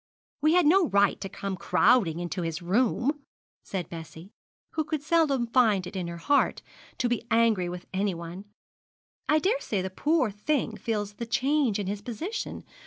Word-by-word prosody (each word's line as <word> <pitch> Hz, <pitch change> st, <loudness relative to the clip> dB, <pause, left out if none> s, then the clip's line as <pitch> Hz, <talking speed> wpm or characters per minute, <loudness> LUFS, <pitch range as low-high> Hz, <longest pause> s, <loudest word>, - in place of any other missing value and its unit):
'We 310 Hz, +2 st, +4 dB
had 360 Hz, -2 st, +5 dB
no 355 Hz, +3 st, +5 dB
right 200 Hz, -3 st, +2 dB
to 195 Hz, -, -4 dB
come 195 Hz, 0 st, -4 dB
crowding 185 Hz, 0 st, +3 dB
into 175 Hz, +1 st, -3 dB
his 165 Hz, -2 st, -3 dB
room,' 245 Hz, -, +1 dB, 0.4 s
said 180 Hz, -4 st, -4 dB
Bessie, 165 Hz, +3 st, -10 dB, 0.4 s
who 315 Hz, -, -1 dB
could 310 Hz, -2 st, -3 dB
seldom 300 Hz, -6 st, +2 dB
find 225 Hz, -6 st, +3 dB
it 180 Hz, -, -8 dB
in 180 Hz, -2 st, -3 dB
her 170 Hz, 0 st, -6 dB
heart 280 Hz, +12 st, +1 dB, 0.3 s
to 245 Hz, -, +1 dB
be 240 Hz, -1 st, -2 dB
angry 225 Hz, -6 st, +3 dB
with 180 Hz, 0 st, -7 dB
anyone. 185 Hz, -1 st, -3 dB, 0.8 s
'I 305 Hz, -, +5 dB
daresay 370 Hz, -, 0 dB
the 190 Hz, -, -4 dB
poor 290 Hz, -, +1 dB
thing 225 Hz, +2 st, -1 dB
feels 210 Hz, -2 st, -3 dB
the 235 Hz, +2 st, -6 dB
change 260 Hz, -1 st, +1 dB
in 205 Hz, -, -3 dB
his 200 Hz, +2 st, -3 dB
position. 320 Hz, -, -5 dB
215 Hz, 170 wpm, -27 LUFS, 185-285 Hz, 0.8 s, had